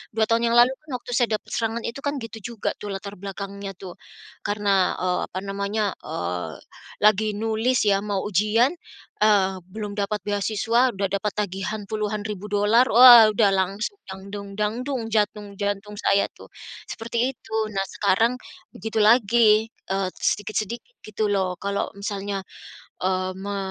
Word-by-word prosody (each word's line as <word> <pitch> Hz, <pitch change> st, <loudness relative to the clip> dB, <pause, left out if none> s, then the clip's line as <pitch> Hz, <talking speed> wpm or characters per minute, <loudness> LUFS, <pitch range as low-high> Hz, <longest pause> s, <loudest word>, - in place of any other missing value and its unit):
2 220 Hz, -, +2 dB
tahun 230 Hz, 0 st, +2 dB
yang 235 Hz, -, +2 dB
lalu 245 Hz, +2 st, +6 dB
pun 305 Hz, -, -21 dB
waktu 245 Hz, -, -10 dB
saya 230 Hz, -3 st, +2 dB
dapat -, -, -20 dB
serangan 230 Hz, 0 st, -1 dB
itu 230 Hz, +4 st, -5 dB
kan 285 Hz, 0 st, -1 dB
gitu 225 Hz, -1 st, -7 dB, 0.2 s
juga -, -, -1 dB
tuh 210 Hz, -, -5 dB
latar 200 Hz, +1 st, -6 dB
belakangnya 200 Hz, +1 st, -6 dB
tuh, 180 Hz, -2 st, -9 dB, 0.5 s
karena, 200 Hz, -2 st, +1 dB
eee, 180 Hz, 0 st, 0 dB
apa 185 Hz, -, -5 dB
namanya, 200 Hz, +1 st, -1 dB
eee, 90 Hz, -2 st, -4 dB, 0.5 s
lagi 215 Hz, 0 st, +4 dB
nulis 225 Hz, +3 st, +1 dB
ya 195 Hz, -1 st, +4 dB
mau 205 Hz, -2 st, -2 dB
ujian, 215 Hz, +6 st, +2 dB, 0.5 s
eee, 195 Hz, -3 st, +4 dB, 0.2 s
belum 210 Hz, -2 st, -5 dB
dapat 205 Hz, +1 st, -1 dB
beasiswa, 220 Hz, +5 st, +1 dB
udah 195 Hz, 0 st, 0 dB
dapat 200 Hz, +1 st, -1 dB
tagihan 205 Hz, +1 st, -3 dB
puluhan 215 Hz, -1 st, -2 dB
ribu 210 Hz, -1 st, -6 dB
dolar, 210 Hz, +5 st, +4 dB
wah, 240 Hz, -1 st, +10 dB
udah 210 Hz, -1 st, +3 dB
langsung 195 Hz, -, -1 dB
dang 190 Hz, 0 st, -8 dB
dung 200 Hz, -1 st, -6 dB
dang 210 Hz, +1 st, 0 dB
dung 260 Hz, -5 st, -2 dB
jantung 210 Hz, -1 st, -1 dB
jantung 205 Hz, 0 st, -2 dB
saya 200 Hz, 0 st, +3 dB
tuh, -, -, -14 dB, 0.4 s
seperti 235 Hz, +2 st, -1 dB
itu. 220 Hz, -1 st, -8 dB, 0.2 s
Nah, 195 Hz, -1 st, -1 dB
sekarang 225 Hz, +6 st, +2 dB, 0.4 s
begitu 220 Hz, +3 st, -5 dB
lagi, 220 Hz, -1 st, +5 dB, 0.2 s
eee, 195 Hz, -1 st, 0 dB
sedikit-sedikit 215 Hz, -, -2 dB
gitu 215 Hz, 0 st, -1 dB
loh 190 Hz, -2 st, +1 dB
kalau 200 Hz, 0 st, -2 dB
misalnya, 200 Hz, -1 st, -3 dB, 0.6 s
eee, 185 Hz, 0 st, 0 dB
me 200 Hz, +1 st, -4 dB
210 Hz, 155 wpm, -24 LUFS, 195-225 Hz, 0.6 s, wah